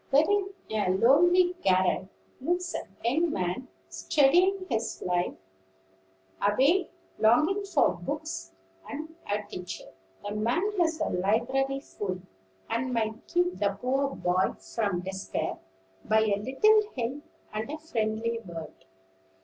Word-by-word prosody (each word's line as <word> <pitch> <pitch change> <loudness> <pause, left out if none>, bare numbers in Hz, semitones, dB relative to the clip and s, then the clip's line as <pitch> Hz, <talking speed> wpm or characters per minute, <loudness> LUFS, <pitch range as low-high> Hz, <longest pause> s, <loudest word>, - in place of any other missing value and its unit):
There 280 +2 +6
in 405 -1 +2 0.2
a 210 -3 +1
lonely 350 - +5
garret 185 0 +2 0.3
lives 350 +6 -1
a - - -4 0.2
young 320 +8 +2
man 180 - -2 0.2
studying 310 - +3
his 230 -2 -2
life 180 -1 0 1.1
away, 270 - +3 0.3
longing 310 - +4
for 360 -7 +3
books 95 - -5 0.4
and 315 +2 -6 0.2
a 210 +1 0
teacher. 180 -3 -7 0.3
The - - -3
man 240 - 0
has 325 -2 +2
a - - +1
library 260 +9 +1
full, 190 -8 -4 0.5
and 250 +2 -1
might 220 -1 -2
keep 355 +1 +1
the 200 -1 0
poor 270 +3 0
boy 180 +1 +1 0.2
from 200 -6 0
despair 190 +1 -3 0.4
by 220 +1 +3
a 215 -2 +2
little 270 - +4 0.2
help 255 +4 -2 0.3
and 215 +3 -3
a 305 - -4
friendly 230 -6 -1
word. 170 -6 -8
235 Hz, 125 wpm, -28 LUFS, 200-315 Hz, 1.1 s, There